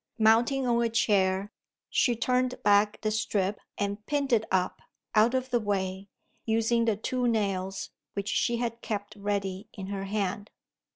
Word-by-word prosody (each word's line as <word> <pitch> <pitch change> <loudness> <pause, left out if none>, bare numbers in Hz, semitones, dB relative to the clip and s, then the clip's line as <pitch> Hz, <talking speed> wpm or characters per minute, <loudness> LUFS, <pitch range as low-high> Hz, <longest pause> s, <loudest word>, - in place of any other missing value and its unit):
Mounting 235 +4 +4
on 235 -1 +2
a 235 - +2
chair, 200 -3 +2 0.4
she 245 -3 +2
turned 250 +2 +1
back 205 +1 +4
the 215 - 0
strip 210 -3 0 0.2
and 205 +1 -2
pinned 285 -3 0
it 220 -1 +3
up, 185 -1 0 0.3
out 225 +4 +4
of 260 0 -1
the 240 - +3
way, 195 -2 -2 0.3
using 225 +1 +2
the 220 -3 +1
two 250 +3 -1
nails, 195 -4 -1 0.2
which 200 0 -3
she 235 +3 +1
had 230 -1 -3
kept 205 -1 -4
ready 200 -1 -2
in 195 -4 -7
her 195 0 -3
hand. 205 0 -2
215 Hz, 160 wpm, -28 LUFS, 200-235 Hz, 0.4 s, Mounting